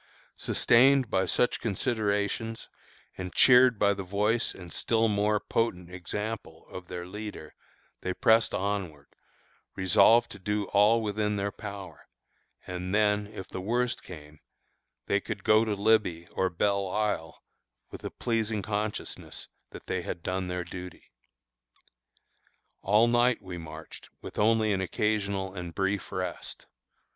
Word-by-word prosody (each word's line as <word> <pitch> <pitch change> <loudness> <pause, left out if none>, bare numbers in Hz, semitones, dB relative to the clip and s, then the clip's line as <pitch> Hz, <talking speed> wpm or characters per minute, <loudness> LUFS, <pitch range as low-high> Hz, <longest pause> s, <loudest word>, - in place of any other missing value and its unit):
Sustained 130 +1 +4
by 95 0 +1
such 125 - +1
considerations, 110 0 -1 0.5
and 90 -1 -6
cheered 125 -2 +6
by 100 0 +3
the 100 - -5
voice 105 +5 0
and 90 -2 -10
still 115 -1 +1
more 105 0 +1
potent 90 -7 -2
example 105 +5 -5
of 90 -1 -8
their 90 -1 -6
leader, 105 -5 -8 0.5
they 95 - -2
pressed 110 +4 +3
onward, 95 -7 -3 0.7
resolved 95 +5 +5
to 100 - -9
do 105 +2 -1
all 105 +3 +4
within 105 0 -1
their 100 0 -1
power, 100 -2 -9 0.6
and 90 +1 -3
then, 105 -1 +2
if 105 -3 -9
the 95 - -6
worst 120 +5 0
came, 75 -3 -12 0.7
they - - +2
could - - -6
go 110 +1 +5
to 110 -2 -1
"Libby" 100 -5 +2
or 95 - 0
"Belle 100 +2 0
Isle," 100 -5 -2 0.5
with - - -9
the - - -4
pleasing 110 -3 -2
consciousness 105 0 -4 0.2
that - - -11
they 95 - -2
had 85 -1 -6
done 95 0 -2
their 90 0 -3
duty. 90 +1 -10 1.7
All 105 +4 +4
night 120 +1 +3
we 90 -2 -8
marched 80 0 -10
with - - -8
only 110 0 +3
an 95 - 0
occasional 100 0 -1
and 90 -3 -7
brief 95 0 -1
rest. 90 -1 -5
100 Hz, 135 wpm, -28 LUFS, 90-110 Hz, 1.7 s, cheered